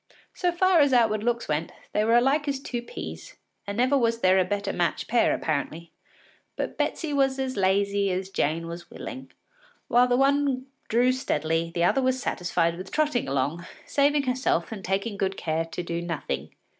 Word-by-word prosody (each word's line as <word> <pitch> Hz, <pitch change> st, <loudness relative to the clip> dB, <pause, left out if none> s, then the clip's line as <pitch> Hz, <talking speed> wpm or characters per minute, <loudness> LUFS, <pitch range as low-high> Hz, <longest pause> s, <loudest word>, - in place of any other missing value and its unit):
So 355 Hz, -1 st, 0 dB
far 365 Hz, 0 st, +3 dB
as 285 Hz, -3 st, +4 dB
outward 220 Hz, -4 st, +3 dB
looks 235 Hz, 0 st, 0 dB
went, 155 Hz, +2 st, -1 dB, 0.2 s
they 210 Hz, -, +2 dB
were 230 Hz, +2 st, +3 dB
as 240 Hz, -, +5 dB
alike 290 Hz, +3 st, +1 dB
as 275 Hz, -1 st, -1 dB
two 245 Hz, -3 st, -4 dB
peas, 240 Hz, -, -8 dB, 0.3 s
and 200 Hz, +1 st, -4 dB
never 255 Hz, +3 st, +3 dB
was 230 Hz, -3 st, +1 dB
there 185 Hz, +1 st, +5 dB
a -, -, +4 dB
better 200 Hz, +2 st, -2 dB
matched 175 Hz, -1 st, -1 dB
pair 235 Hz, +1 st, +3 dB
apparently. 160 Hz, +2 st, -2 dB, 0.6 s
But -, -, -3 dB
Betsy 315 Hz, -3 st, -2 dB
was 270 Hz, -1 st, +2 dB
as 265 Hz, -1 st, -2 dB
lazy 200 Hz, +1 st, +2 dB
as 185 Hz, +1 st, -3 dB
Jane 160 Hz, +1 st, 0 dB
was 170 Hz, +1 st, -8 dB
willing. 265 Hz, 0 st, -8 dB, 0.6 s
While 245 Hz, +1 st, +5 dB
the 245 Hz, 0 st, +2 dB
one 275 Hz, -1 st, +2 dB, 0.2 s
drew 245 Hz, +3 st, +3 dB
steadily, 165 Hz, -, -1 dB
the 170 Hz, -, +1 dB
other 270 Hz, +10 st, +3 dB
was 260 Hz, 0 st, +1 dB
satisfied 170 Hz, -6 st, 0 dB
with 185 Hz, 0 st, -8 dB
trotting 300 Hz, -, +1 dB
along, 140 Hz, +6 st, -1 dB, 0.2 s
saving 285 Hz, +1 st, +2 dB
herself 250 Hz, -9 st, 0 dB
and 205 Hz, -4 st, -6 dB
taking 200 Hz, +3 st, -2 dB
good 195 Hz, 0 st, -1 dB
care 160 Hz, 0 st, -1 dB
to 165 Hz, +2 st, -6 dB
do 170 Hz, 0 st, -3 dB
nothing. 110 Hz, -, -4 dB
210 Hz, 185 wpm, -26 LUFS, 170-260 Hz, 0.6 s, as